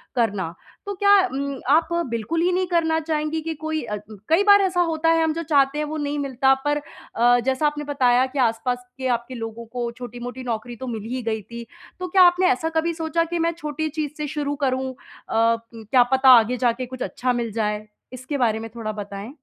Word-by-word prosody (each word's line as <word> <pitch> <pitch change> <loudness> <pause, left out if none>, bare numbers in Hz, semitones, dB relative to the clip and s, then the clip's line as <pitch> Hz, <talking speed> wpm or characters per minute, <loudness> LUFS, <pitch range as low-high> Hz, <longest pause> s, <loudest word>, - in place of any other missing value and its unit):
करना। 200 -8 0 0.3
तो 405 - -3
क्या 400 +1 +3 0.2
उम, 275 0 -3
आप 315 +4 +4 0.2
बिल्कुल 235 +9 -2
ही 355 +2 +2
नहीं 365 +1 0
करना 320 -2 +1
चाहेंगी 310 0 -2
कि 325 +1 -3
कोई 315 +1 -3
अ, 210 -3 -4 0.2
उ - - -8
कई 335 +5 +4
बार 405 -1 +7
ऐसा 365 -2 +1
होता 325 -1 +1
है, 330 0 +4
हम 320 -1 +1
जो 335 +1 -4
चाहते 280 -2 +2
हैं, 300 - 0
वो 310 +1 -4
नहीं 290 -1 -2
मिलता, 270 -1 +2
पर 290 0 +2 0.4
अ, 245 +1 +4
जैसा 265 +3 +1
आपने 295 0 -3
बताया 255 -3 +3
कि 285 - -2
आसपास 245 +1 0
के 260 -1 -2
आपके 240 +2 -11
लोगों 225 0 -6
को 240 +1 -4
छोटी-मोटी 245 +1 -7
नौकरी 240 0 -4
तो 260 +2 -7
मिल 225 -3 -4
ही 255 - -2
गई 220 -1 -2
थी। 235 +3 -9 0.3
तो 365 - -3
क्या 370 +1 +4
आपने 355 +1 +5
ऐसा 325 -4 -1
कभी 325 +1 0
सोचा 325 0 0
कि, 335 +1 -3
"मैं 335 +1 +2
छोटी 310 -1 -3
चीज़ 305 -1 -3
से 300 -1 -3
शुरू 290 -1 -2
करूँ 260 0 0
अ, - - -22 0.4
क्या 230 +1 +2
पता 265 0 +5
आगे 235 +3 -1
जा 245 -1 +3
के 255 +2 -5
कुछ 255 +1 -10
अच्छा 250 0 -1
मिल 235 -2 -2
जाए?" 210 -1 -2 0.3
इसके 255 +3 -4
बारे 225 -4 +1
में 225 0 -7
थोड़ा 220 -2 -4
बताएँ। 205 0 -7
265 Hz, 220 wpm, -23 LUFS, 235-320 Hz, 0.4 s, बार